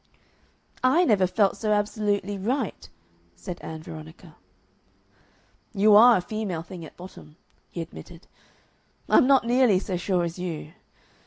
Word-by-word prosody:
"I 315 +8 +4
never 200 - +3
felt 200 +1 +1
so 215 0 -2
absolutely 205 -1 -1
right," 225 +4 -3 0.5
said 85 - -8
Ann 160 0 -8
Veronica. 160 +1 -12 1.4
"You 205 +1 +5
ARE 235 +2 +8
a - - -2
female 190 -4 -4
thing 175 -1 -10
at 155 - -13
bottom," 175 -4 -13 0.3
he 170 - -6
admitted. 170 +2 -13 0.8
"I'm 255 - +4
not 270 -3 +4
nearly 240 -4 +3
so 185 -1 -3
sure 180 0 0
as 170 +1 -5
you. 165 -3 -6
190 Hz, 135 wpm, -25 LUFS, 170-215 Hz, 1.4 s, ARE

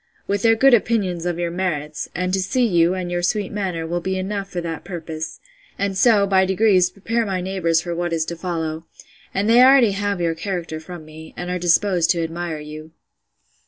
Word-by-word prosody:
—with 200 0 -1
their 225 0 +4
good 270 +3 +5
opinion 195 -7 +1
of 175 -1 -2
your 175 -1 -2
merits: 155 -5 -3
and 180 +1 -1
to 190 - +1
see 240 +7 +1
you, 175 -3 +3
and 180 -1 -4
your 175 0 -1
sweet 200 +2 -1
manner, 185 -5 -3
will 175 +2 -2
be 190 +2 -2
enough 195 +1 -3
for 180 - -4
that 165 -2 -5
purpose; 160 -3 -6 0.4
and 200 -1 -1
so, 210 0 +4
by 190 -1 +3
degrees, 190 -1 +3
prepare 230 +4 -2
my 195 -4 -2
neighbours 180 -3 0
for 175 0 -4
what 175 0 -2
is 165 -1 0
to 170 - -5
follow: 165 -2 -4 0.4
And 200 +2 -1
they 235 +2 +6
already 255 -4 +6
have 200 -1 -2
your 170 -1 0
character 165 -2 -4
from 160 0 -10
me, 155 +1 -12
and 180 0 -4
are 180 - -2
disposed 175 0 +2
to 170 -1 +2
admire 165 -1 -4
you. 155 +1 -10
180 Hz, 205 wpm, -21 LUFS, 165-200 Hz, 0.4 s, they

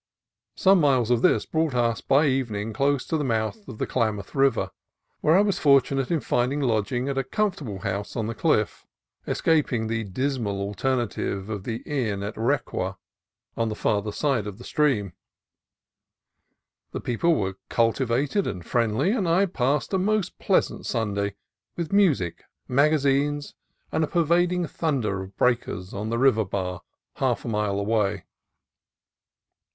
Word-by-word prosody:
Some 190 0 +5
miles 130 -6 +3
of 120 -2 +3
this - - +3
brought 160 -4 0
us 115 -2 +1
by 145 +3 +3
evening 115 -6 -1
close 140 +2 +1
to 160 - -1
the 150 - -1
mouth 115 - -2
of 125 - -8
the - - -1
Klamath 110 -5 -1
River, 135 -1 +2 0.5
where 155 +4 +4
I - - +6
was 205 -2 +1
fortu 140 -2 +4
nate 135 -2 -1
in 165 -4 +1
finding 125 +5 0
lodging 120 0 0
at 135 -1 -1
a - - 0
comfortable 145 - -2
house 100 0 -3
on 115 - -1
the 115 - -3
cliff, - - 0 0.4
escaping 145 -8 +1
the 110 0 -1
dismal 110 -1 -2
alternative 105 -1 -2
of 100 -2 -5
the 115 -1 -4
inn 110 -9 -2
at 105 +1 -4
Requa, 110 -6 -1 0.6
on 115 -1 0
the 110 - -3
farther 105 0 0
side 125 -3 0
of 100 -2 -7
the 120 - -11
stream. 125 - +1 1.8
The - - -3
peo 120 - -3
ple 170 -1 +4
were 95 -5 -2
cultivated 130 - +1
and 90 -3 -5
friendly, 120 - +1
and 205 -7 0
I 185 +4 +4
passed 145 -2 -1
a 190 - +3
most 210 0 0
pleasant - - +1
Sunday, 100 -3 -1 0.4
with 170 +1 -3
music, 155 - +2 0.2
magazines, 145 +1 +2 0.4
and 160 - +1
a - - 0
pervading 175 +2 +2
thunder 125 - -1
of 95 +1 -10
breakers 120 -7 0
on 105 +2 -4
the 115 - -1
river 120 -3 +4
bar 90 -3 -3 0.4
half - - 0
a - - -4
mile 105 -3 0
away. 105 -2 0
125 Hz, 155 wpm, -25 LUFS, 105-145 Hz, 1.8 s, I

